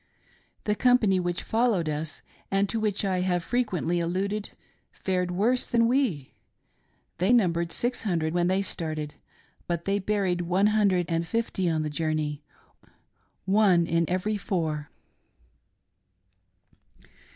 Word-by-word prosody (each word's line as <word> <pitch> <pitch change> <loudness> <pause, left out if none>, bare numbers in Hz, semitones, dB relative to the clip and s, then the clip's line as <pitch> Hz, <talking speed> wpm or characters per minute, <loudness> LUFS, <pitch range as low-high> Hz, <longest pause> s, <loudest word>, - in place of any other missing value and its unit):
The 210 - +1
company 220 -5 +3
which 175 0 -2
followed 220 -7 +1
us, 150 0 -4 0.3
and 195 +1 +2
to 225 - -1
which 210 -2 0
I 185 -2 0
have 180 -2 0
frequently 185 -8 0
alluded, 195 +5 -2 0.4
fared 180 -1 -1
worse 220 +8 +1
than 230 -1 +3
we. 235 - 0 0.9
They 185 +6 +3
num 210 -9 +4
bered 170 0 -2
six 245 +1 -1
hundred 165 -6 -1
when 175 0 +2
they 190 +2 +1
started, 155 -5 -4 0.5
but 170 -1 -2
they 200 +1 +1
buried 190 -3 0
one 185 +4 +2
hundred 195 -5 +3
and 165 0 -1
fifty 195 -4 -1
on 160 -1 0
the 155 - -2
journey 155 -1 -2 0.6
— - - -42 0.2
one 190 -3 +4
in 165 0 +1
every 185 +4 0
four. 160 -7 -2
185 Hz, 135 wpm, -27 LUFS, 170-210 Hz, 0.9 s, num